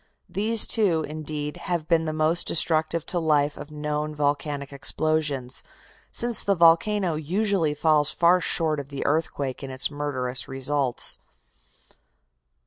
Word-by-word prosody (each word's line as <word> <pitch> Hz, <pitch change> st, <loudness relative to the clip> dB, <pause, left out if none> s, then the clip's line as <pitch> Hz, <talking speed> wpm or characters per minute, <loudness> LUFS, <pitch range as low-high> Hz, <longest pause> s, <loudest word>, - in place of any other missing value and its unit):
These 220 Hz, +2 st, +3 dB
two, 185 Hz, -8 st, +2 dB
indeed, 150 Hz, -1 st, -5 dB
have 170 Hz, -3 st, -3 dB
been 165 Hz, -2 st, +2 dB
the 155 Hz, -, -2 dB
most 155 Hz, +2 st, +1 dB
destructive 160 Hz, 0 st, +2 dB
to 175 Hz, -, -2 dB
life 150 Hz, -3 st, +1 dB
of 145 Hz, -, -10 dB
known 150 Hz, 0 st, -4 dB
volcanic 145 Hz, -1 st, -2 dB
explosions, 145 Hz, -3 st, -1 dB, 0.5 s
since 240 Hz, -1 st, +1 dB
the 200 Hz, -, +1 dB
volcano 170 Hz, +2 st, +3 dB
usually 165 Hz, 0 st, -1 dB
falls 150 Hz, -1 st, +3 dB
far 175 Hz, +1 st, +3 dB
short 160 Hz, -3 st, +1 dB
of 140 Hz, -1 st, -8 dB
the 140 Hz, -1 st, -5 dB
earthquake 145 Hz, -3 st, -2 dB
in 135 Hz, -, -7 dB
its 130 Hz, +2 st, +2 dB
murderous 130 Hz, -4 st, -2 dB
results. 135 Hz, -1 st, 0 dB
155 Hz, 135 wpm, -24 LUFS, 145-165 Hz, 0.5 s, These